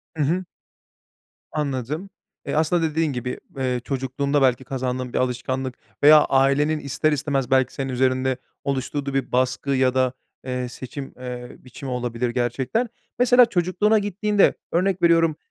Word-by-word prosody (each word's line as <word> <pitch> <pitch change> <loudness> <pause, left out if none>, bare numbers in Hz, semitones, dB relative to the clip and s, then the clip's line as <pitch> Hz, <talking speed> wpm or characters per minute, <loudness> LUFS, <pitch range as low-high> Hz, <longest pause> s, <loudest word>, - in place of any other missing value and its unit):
Hı 150 - 0
hı. 175 +6 0 1.1
Anladım. 150 +4 -3 0.4
E, - - -2
aslında 160 +2 +2
dediğin 160 -2 0
gibi, 125 0 -4 0.2
eee, 125 -2 -1
çocukluğunda 140 +1 -1
belki 130 0 +3
kazandığın 125 -1 -3
bir - - 0
alışkanlık 130 +1 -2 0.3
veya 150 0 +9
ailenin 140 +3 +2
ister 145 +2 0
istemez 140 -3 -1
belki 130 -1 +3
senin 135 -1 -3
üzerinde 130 0 +1 0.3
oluşturduğu 140 +1 -2
bir 135 - -1
baskı 130 +2 0
ya 130 -1 +3
da, 130 -1 +2 0.3
eee, 125 -1 -3
seçim, 135 +2 -8
eee, 125 -1 -7
biçimi 130 +1 -8
olabilir 120 -1 -2
gerçekten. 130 - -1 0.3
Mesela 245 0 +7
çocukluğuna 205 +2 +2
gittiğinde 205 0 +2 0.2
örnek 185 +1 +1
veriyorum, 165 -2 +4
135 Hz, 140 wpm, -23 LUFS, 130-155 Hz, 1.1 s, veya